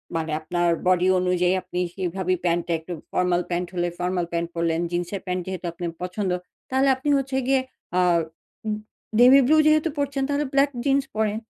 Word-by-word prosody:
মানে 160 -1 -2
আপনার 175 +2 0 0.2
বডি 185 0 +4
অনুযায়ী 180 0 +2
আপনি 180 - -4
সেভাবেই 185 0 -1
প্যান্ট 170 0 +2
টা 170 - 0
একটু 165 +3 -7 0.2
ফরমাল 180 -1 +1
প্যান্ট 175 0 -1
হলে 175 0 0
ফরমাল 180 0 0
প্যান্ট 170 0 -1
পরলেন, 165 0 0
জিন্সের 175 +2 -2
প্যান্ট 180 -1 -2
যেহেতু 185 -1 -5
আপনার 170 0 -4
পছন্দ। 185 +1 -2 0.4
তাহলে 265 +1 +2
আপনি 265 +3 -3
হচ্ছে 270 0 -2
গিয়ে 270 -1 +3 0.4
আ - - +5 0.7
ইন 215 - +1 0.5
নেভিব্লু 270 +4 +7
যেহেতু 310 +1 +4
পরছেন 280 -1 -1
তাহলে 290 +1 0
ব্লাক 275 +1 +4 0.2
জিন্স 275 0 +3
পরেন। 215 0 0
185 Hz, 170 wpm, -24 LUFS, 175-265 Hz, 0.7 s, নেভিব্লু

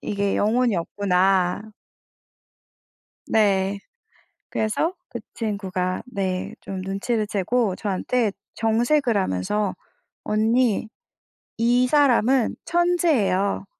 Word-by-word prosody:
'이게 200 -1 -1
영혼이 235 +1 +2
없구나.' 185 +1 +1 1.7
네. 200 -2 +2 0.7
그래서 220 +11 -1 0.2
그 240 - -6
친구가 190 -4 -3
네 190 -6 -3
좀 190 -1 -6
눈치를 205 +3 -2
채고 205 0 0
저한테 210 +3 -1 0.2
정색을 235 +2 +2
하면서 190 - -1 0.5
"언니 220 +1 +1 0.7
이 240 +2 +3
사람은 265 -3 +3
천재예요. 320 - +1
210 Hz, 185 characters per minute, -23 LUFS, 195-245 Hz, 1.7 s, 이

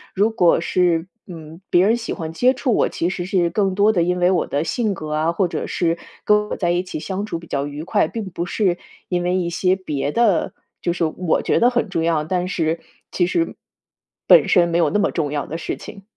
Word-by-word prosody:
如 205 +4 +2
果 180 -7 +3
是， 170 -1 +1 0.2
嗯， 165 -1 -10
别 175 +2 +4
人 225 - +4
喜 230 - -4
欢 160 -1 -6
接 250 +9 +3
触 255 -2 0
我， - - +2
其 170 - -1
实 180 -1 -4
是 180 -2 +1
更 195 -3 0
多 205 +2 +4
的 185 -5 +1
因 180 +2 +1
为 180 +1 +3
我 180 - +1
的 145 +2 -1
性 215 +5 -1
格 155 -3 -6
啊， 155 +2 +1
或 175 +2 +1
者 - - -4
是 170 -1 0 0.3
跟 210 0 +3
我 - - -2
在 175 -2 0
一 175 +1 +1
起 180 - -6
相 195 +4 -4
处 170 - -3
比 165 - -11
较 140 -2 -2
愉 145 +1 -6
快， 160 - +1
并 225 +4 -5
不 175 -2 -4
是 180 -1 0 0.3
因 180 -1 -1
为 180 +1 0
一 175 -2 0
些 185 +1 +2
别 150 -6 -3
的 215 -8 +2 0.3
就 175 - 0
是 175 -1 0
我 160 +1 0
觉 - - +2
得 240 - +5
很 240 -4 -1
重 165 -3 -1
要， 165 -2 +1
但 180 +2 -1
是 165 -3 -1 0.3
其 175 - +1
实， 330 - -1 0.7
本 - - +7
身 175 -3 +5
没 170 0 0
有 170 - +3
那 210 - 0
么 - - +1
重 150 -4 -2
要 145 -1 -2
的 160 - -5
事 - - -4
情。 200 -2 -11
175 Hz, 260 characters per minute, -21 LUFS, 165-195 Hz, 0.7 s, 本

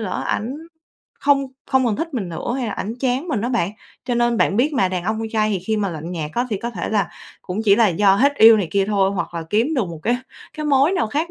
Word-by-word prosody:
lỡ 210 -4 -3
ảnh 245 +7 -2 0.6
không 280 -1 +3 0.2
không 265 -1 +3
còn 215 - 0
thích 330 +2 -4
mình 200 -8 -2
nữa, 170 +8 -4
hay 250 -3 -2
là 210 - -3
ảnh 220 +3 -4
chán 265 +6 -1
mình 240 -9 -1
á 240 - -1
bạn, 225 -8 0 0.3
cho 245 - -1
nên 240 0 +2
bạn 200 - +2
biết 285 +6 +2
mà, 255 -9 +2
đàn 180 -1 -3
ông 220 +1 -1
con 225 - -3
trai 215 -1 +1
thì 200 - 0
khi 215 +5 -2
mà 205 -2 0
lạnh 165 +1 -6
nhạt 155 -3 -4
á 245 +1 0
thì 205 - 0
có 235 +4 -4
thể - - -4
là 210 -2 +1 0.3
cũng 185 +4 -4
chỉ 200 -2 +5
là 225 -2 +5
do 195 +2 +3
hết 280 +4 +3
yêu 225 0 +8
này 190 -6 -1
kia 200 -1 +2
thôi, 195 -2 +2
hoặc 175 -3 -4
là 165 - -3
kiếm 240 +9 +1
được 245 -7 +1
một 165 -2 -8
cái 240 +2 +1 0.4
cái 305 -1 -4
mối 280 +4 +4
nào 230 - +1
khác 310 +9 -2
220 Hz, 280 wpm, -21 LUFS, 195-255 Hz, 0.6 s, yêu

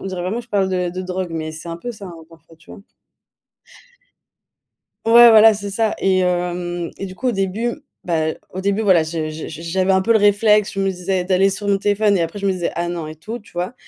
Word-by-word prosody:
on - - -6
dirait 185 -2 -4
vraiment 200 +7 -2
je 240 - -16
parle 195 -3 0
de 180 -1 -1
de 185 +2 -5
drogue, 185 -1 -4
mais 155 -1 -4
c'est 160 +2 -9
un 165 - -5
peu 245 +8 -6
ça, 210 -3 -10
hein, 175 - -10
parfois, 165 0 -19
tu 160 - -19
vois? - - -12 2.2
Ouais 235 +1 +8
voilà 220 0 +7
c'est 205 -1 -6
ça 220 +2 0
et 190 -1 +2
hem, 175 -1 -2
et 195 - -5
du 185 - -9
coup 255 - -3
au - - +1
début 220 +8 -2 0.2
bah, 160 -2 0 0.2
au 185 - -7
début 200 +3 0
voilà 190 -5 +4
je 160 -1 -4
je 155 0 -7
j 160 +1 -9
j'avais 185 +3 +1
un 190 - +3
peu 230 - 0
le 225 - +6
réflexe, 210 0 +3
je 195 - -4
me 195 - +1
disais 185 0 -2
d'aller 190 +1 +2
sur 205 +1 -3
mon 200 - +3
téléphone 205 0 +1
et - - 0
après 165 +4 -3
je 200 - -4
me 195 - +2
disais: 180 -2 -2
«Ah 170 0 -2
non, 170 -3 -4
et 155 - -8
tout», 220 +10 -7
tu 210 - -20
vois? 180 +6 -3
190 Hz, 250 wpm, -19 LUFS, 175-205 Hz, 2.2 s, Ouais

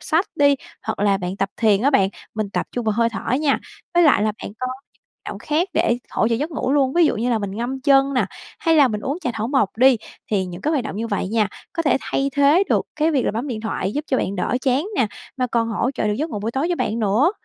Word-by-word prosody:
sách 335 +5 +1
đi, 285 -1 +5 0.3
hoặc 220 - -2
là 200 -1 +3
bạn 180 +1 -4
tập 195 - 0
thiền 215 -2 +3
á 280 - +4
bạn, 195 -9 +4 0.3
mình 215 -2 -2
tập - - -2
trung 245 -2 -3
vào 215 - +2
hơi 230 +2 +2
thở 230 - -4
nha. 295 -3 +2 0.4
Với 345 - +5
lại 290 - +5
là 215 -1 +1
bạn - - -6
có 255 - -2 0.6
động - - -6
khác 330 +6 0
để 325 -8 +2
hỗ 220 - +1
trợ 230 - +1
giấc 295 +8 -2
ngủ 275 -4 -1
luôn, 270 -2 +2
ví 345 +2 +4
dụ - - 0
như 235 +3 0
là 230 - +2
mình 200 -2 -4
ngâm 250 +3 -3
chân 275 0 +4
nè 250 - +2 0.3
hay 325 -1 +3
là 285 -3 +6
mình 210 -3 -3
uống 280 +9 -3
trà 250 - -1
thảo 225 +1 -2
mộc 265 -9 +1
đi, 255 +1 +6 0.3
thì 195 -3 +1
những 180 0 -8
cái 305 - 0
hoạt 280 -7 0
động - - -5
như 230 +2 -2
vậy 200 -3 -2
nha 215 -1 +1 0.2
có 330 - -1
thể 290 - +3
thay 275 +1 -1
thế 285 +7 +5
được - - +1
cái 310 +1 +2
việc 275 -5 +1
là - - +1
bấm 235 +7 -3
điện 220 -3 -4
thoại, 205 -3 -2
giúp 295 +4 -3
cho 265 - +2
bạn 195 +1 -2
đỡ 180 +7 0
chán 270 +4 +2
nè, 240 - +3 0.3
mà 255 -1 0
còn 230 -1 0
hỗ 230 +3 0
trợ 275 - -3
được 210 - +1
giấc 310 +5 -2
ngủ 210 - -3
buổi 220 +3 -2
tối 270 +5 0
cho 350 - +1
bạn 225 -6 -1
nữa. 220 - +3
250 Hz, 280 wpm, -21 LUFS, 215-285 Hz, 0.6 s, là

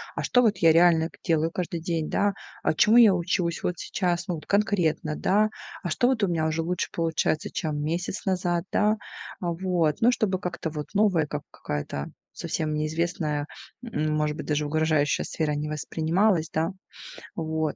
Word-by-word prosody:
а - - -3
что 250 - +4
вот 220 -4 +3
я 165 -1 +5
реально 165 -1 +5
к - - -19
делаю 160 -1 +2
каждый 175 -1 -3
день, 165 -2 -2
да, 205 0 +1 0.3
а - - +2
чему 215 +8 +5
я 225 -5 +8
учусь 170 -1 -1
вот 180 - 0
сейчас, 180 -1 -1
ну, 180 - -1
вот 155 - -9
конкретно, 180 -7 +1
да, 210 +6 +2 0.3
а 175 - -2
что 245 +9 +2
вот 250 -4 +1
у - - +4
меня 165 -3 0
уже 160 +1 0
лучше 175 +2 -2
получается, 165 -2 0
чем 150 -2 -2
месяц 170 +6 -3
назад, 180 -2 0
да. 215 +1 +2 0.4
Вот. 170 -3 0
Ну, 235 +2 +6
чтобы 200 -6 0
как-то 180 -3 -4
вот 150 -1 -5
новая, 200 -6 +3
как 150 -1 -5
какая-то 75 -1 -4 0.3
совсем 155 -1 -2
неизвестная, 155 -1 -1 0.3
может 155 -8 -1
быть, - - -6
даже 150 0 0
угрожающая 155 -1 +1
сфера 155 -2 -1
не 150 +1 -3
воспринималась, 160 +3 +1
да. 160 +3 0 0.6
Вот. 160 -2 -2
165 Hz, 170 wpm, -26 LUFS, 155-185 Hz, 0.6 s, я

